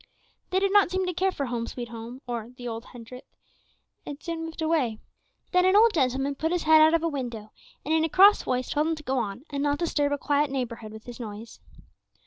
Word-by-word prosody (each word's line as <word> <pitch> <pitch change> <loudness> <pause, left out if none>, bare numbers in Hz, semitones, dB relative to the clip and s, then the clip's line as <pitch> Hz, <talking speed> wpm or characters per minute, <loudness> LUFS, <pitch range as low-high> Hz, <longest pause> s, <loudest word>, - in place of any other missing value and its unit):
They 370 - 0
did 390 +1 +1
not 410 -4 +5
seem 375 +1 -1
to 360 - -2
care 380 +3 +1
for 285 -6 -3
"Home, 235 -2 -3
sweet 240 -2 -6
Home," 235 +3 -9
or 235 -2 -5
the 245 - -7
"Old 230 0 -5
Hundredth," 245 +1 -12 0.8
and 290 - -7
soon 330 0 -5
moved 325 0 -9
away. 295 -9 +1 0.5
Then 360 0 +4
an 375 +1 +4
old 445 +1 +6
gentleman 270 -1 +1
put 315 +4 -2
his 355 -1 0
head 315 0 +6
out 315 +1 +6
of 330 - 0
a - - +2
window, 240 -8 -5 0.3
and 310 - 0
in 320 0 +3
a 325 - 0
cross 400 +5 +6
voice 255 0 -2
told 300 +1 +1
him 325 - 0
to 305 - -11
go 265 -2 0
on 215 +2 -4
and 280 -1 -2
not 290 0 +1
disturb 295 -4 0
a 285 - 0
quiet 290 +1 +1
neighborhood 235 -5 -4
with 220 0 -11
his 245 0 -9
noise. 220 0 -8
285 Hz, 235 wpm, -26 LUFS, 240-325 Hz, 0.8 s, old